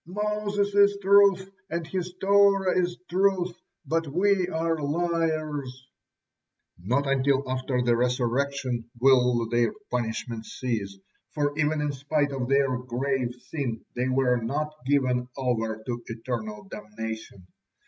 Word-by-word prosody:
"Moses 205 +1 -1
is 200 0 +5
truth, 195 -1 +5 0.2
and 170 0 -2
his 180 +1 -4
Torah 195 -1 +4
is 175 -1 0
truth, 185 -1 +1 0.3
but 165 0 0
we 185 +4 +2
are 165 -1 0
liars." 155 -4 -2 1.0
Not 125 +8 +1
until 135 0 +1
after 130 -1 -1
the 120 -1 +3
Resurrection 125 0 -1
will 125 -2 +4
their 120 - +2 0.2
punishment 115 -1 -3
cease, 105 -6 -3 0.4
for 145 -1 0
even 155 0 +1
in 150 -1 0
spite 145 +1 0
of 130 -2 -3
their 135 -2 +2
grave 125 0 -2
sin 130 -8 -3
they 125 +1 0
were 130 -1 +2
not 145 +7 -2
given 130 -3 +1
over 115 -4 -1
to 120 -1 -3
eternal 115 -2 -5
damnation. 105 -1 -7
135 Hz, 125 wpm, -26 LUFS, 120-170 Hz, 1.0 s, is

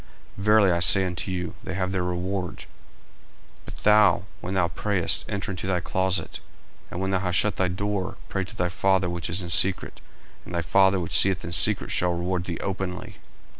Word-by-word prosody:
Verily 105 -1 +3
I 85 - +1
say 95 +2 +5
unto 90 0 -4
you, 90 -2 -4
They 95 - -5
have 95 0 -2
their 95 -2 -1
reward. 90 +1 -3
40:006:006 - - -11 1.0
But - - -9
thou, 105 -4 +4
when 90 - -5
thou 90 -2 +2
prayest, 90 -4 -1
enter 100 0 -3
into 95 0 -5
thy 90 -2 0
closet, 95 +2 -2 0.5
and 85 - -6
when 95 0 -2
thou 95 - +1
hast 90 -2 0
shut 105 +4 +1
thy 95 - +1
door, 95 +1 -3
pray 95 - -2
to 95 +3 -10
thy 90 -4 -1
Father 95 -1 +1
which 85 -1 -4
is 90 +3 -2
in 85 - -5
secret; 95 +3 +2 0.4
and 85 - -8
thy 85 - -1
Father 95 +2 +3
which 85 - -1
seeth 95 -2 +5
in 85 - -6
secret - - +3
shall 90 -1 +1
reward 90 0 -2
thee 85 -3 -4
openly. 95 -1 -5
95 Hz, 200 wpm, -25 LUFS, 90-95 Hz, 1.0 s, say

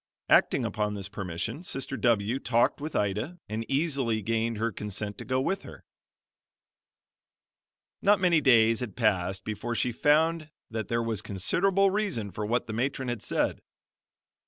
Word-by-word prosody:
Acting - - +4
upon 105 -1 -1
this 100 -2 -5
permission, 100 - -4
Sister 135 -6 -3
W 115 0 +1
talked 120 +2 +1
with 155 +1 -5
Ida 105 - -1
and 110 +2 -3
easily 135 -7 0
gained 115 +1 0
her 115 +2 0
consent 105 0 -5
to - - -7
go 130 0 0
with 190 +9 -1
her. - - -12 2.2
Not 205 0 +4
many 175 -4 +4
days 115 -4 +5
had 115 -6 -5
passed 95 -4 0
before 110 +3 -3
she 125 - +1
found 155 +5 +2 0.2
that 110 -2 -3
there 115 0 0
was 110 -3 -1
considerable 190 - +2
reason 190 - -1
for 105 +3 -4
what 120 +3 0
the 110 - -6
matron 130 +2 -1
had 120 -3 -3
said. - - -1
115 Hz, 155 wpm, -28 LUFS, 105-140 Hz, 2.2 s, days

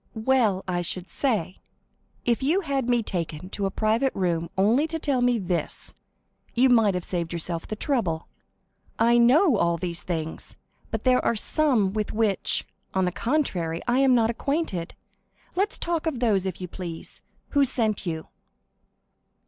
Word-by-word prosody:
"Well, 225 -8 +3
I 175 -1 0
should 180 +1 -4
say! 205 - -1 0.7
If 235 0 +1
you 320 +9 +2
had 275 -7 -1
me 240 -2 +3
taken 170 -3 -4
to 200 -1 -1
a - - -1
private 225 +6 +1
room 170 -3 0
only 230 +11 +3
to 325 0 -3
tell 280 -5 0
me 245 -1 +3
this, 180 -4 -2 0.6
you 255 +2 +5
might 225 -6 +4
have 180 - -2
saved 170 -2 -2
yourself 170 0 -2
the 215 - -4
trouble. 210 - -1 0.7
I 235 +1 +4
know 260 - +5
all 170 -2 +2
these 170 0 -3
things. 160 -2 -4 0.3
But 220 -1 -3
there 255 -1 +3
are 235 - +2
some 225 -5 +2
with 215 -1 -2
which, 215 -3 +1 0.3
on 190 -1 +2
the 180 - 0
contrary, 185 - -1
I 245 +2 +3
am 270 -2 +5
not 230 -1 +3
acquainted. 235 - -2 0.6
Let 395 +3 0
us - - -5
talk 335 -1 -2
of 285 -7 -1
those, 205 -6 +2
if 185 - -5
you 180 - -5
please. 170 -2 -7 0.3
Who 285 -1 +3
sent 230 -5 0
you?" 160 -1 -3
220 Hz, 165 wpm, -25 LUFS, 180-260 Hz, 0.7 s, you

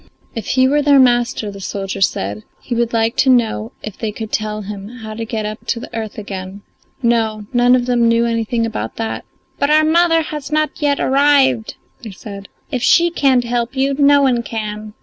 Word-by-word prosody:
If 225 -3 -6
he 260 0 +3
were 295 +2 +2
their 285 -1 +5
master, 240 -4 +2
the 200 0 -10
soldier 195 0 -4
said, 105 - 0 0.2
he 245 - -5
would 235 0 0
like 225 0 +1
to 270 - +3
know 230 -3 +2
if 215 - -8
they 220 -2 -2
could 220 0 -7
tell 215 0 -2
him 200 0 -7
how 225 -3 -9
to 225 +1 -5
get 220 -1 -3
up 215 +1 -7
to 235 - -1
the 230 - -9
earth 220 -2 -5
again. 195 -1 -7 0.4
No, 220 -3 +1
none 245 +1 +5
of 245 -1 0
them 240 -2 +2
knew 230 0 +3
anything 230 0 -1
about 225 -1 -4
that; 225 -1 -4 0.3
"But 280 - +1
our 310 +1 +5
mother 330 0 +3
has 300 -2 -6
not 305 0 +1
yet 285 -1 +1
arrived," 265 -4 +3 0.3
they 230 - -8
said; 200 0 -9 0.2
"if 255 -4 -2
she 340 +6 +4
can't 265 -6 +2
help 240 +1 -2
you, 270 +1 +1
no 285 0 +4
one 250 -3 +2
can." 215 -2 -6
235 Hz, 205 wpm, -18 LUFS, 215-265 Hz, 0.4 s, their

